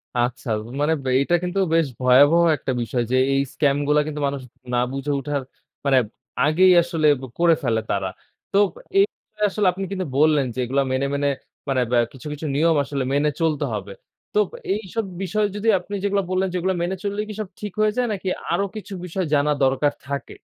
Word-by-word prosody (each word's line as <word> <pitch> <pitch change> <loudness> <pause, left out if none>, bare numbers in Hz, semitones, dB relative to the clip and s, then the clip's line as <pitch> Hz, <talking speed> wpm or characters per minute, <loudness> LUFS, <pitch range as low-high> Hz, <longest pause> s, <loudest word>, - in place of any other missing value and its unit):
আচ্ছা, 120 +1 -1 0.3
মানে 155 +2 +3
ব্যা 130 - -1
এইটা 175 +5 +2
কিন্তু 180 +2 -1 0.2
বেশ 165 -3 +3
ভয়াবহ 145 +7 +6 0.2
একটা 130 - -3
বিষয় 120 +1 -1
যে 130 - +3 0.2
এই 135 - +3
স্ক্যামগুলা 145 +1 +2
কিন্তু 150 -1 -4
মানুষ 140 -1 -3 0.3
না 120 - +3
বুঝে 135 +2 -3
উঠার, 140 0 -2 0.4
মানে 135 -1 +4 0.5
আগেই 180 +4 +5
আসলে 165 -3 0
ব - - -11 0.2
করে 170 -1 +5
ফেলে 115 -3 +1
তারা। 95 -1 0 0.4
তো 195 - +2 0.4
এই 395 - +7
বিষয়ে 210 -1 -4
আসলে 200 -1 +1
আপনি 195 +2 -4
কিন্তু 185 -2 -2
বললেন 150 -2 +4
যে 130 - -6
এগুলা 135 +3 +1
মেনে, 130 +1 +1
মেনে 140 0 +1 0.4
মানে 130 -2 +2
ব্যা 120 - +4
কিছু, 135 +3 -10
কিছু 150 +2 -6
নিয়ম 165 +2 +3
আসলে 140 -1 -3
মেনে 145 +1 +3
চলতে 155 -3 +1
হবে। 100 -1 -5 0.4
তো 210 -2 +3 0.3
এইসব 215 +1 -3 0.2
বিষয় 210 +3 +1
যদি 210 +2 -3
আপনি 205 +3 -7
যেগুলা 200 -1 +1
বললেন, 185 +1 +1
যেগুলা 185 +1 +1
মেনে 180 +2 -1
চললেই 205 +1 -2
কি - - -4
সব 205 - -5
ঠিক 210 -3 -5
হয়ে 215 0 +4
যায়? 245 -1 +2
নাকি 195 -1 -5 0.2
আরো 195 +4 +1
কিছু 205 -2 -7
বিষয় 180 +1 -2
জানা 145 +1 +3
দরকার 135 +2 +2
থাকে? 140 0 -5
150 Hz, 195 wpm, -22 LUFS, 135-190 Hz, 0.5 s, এই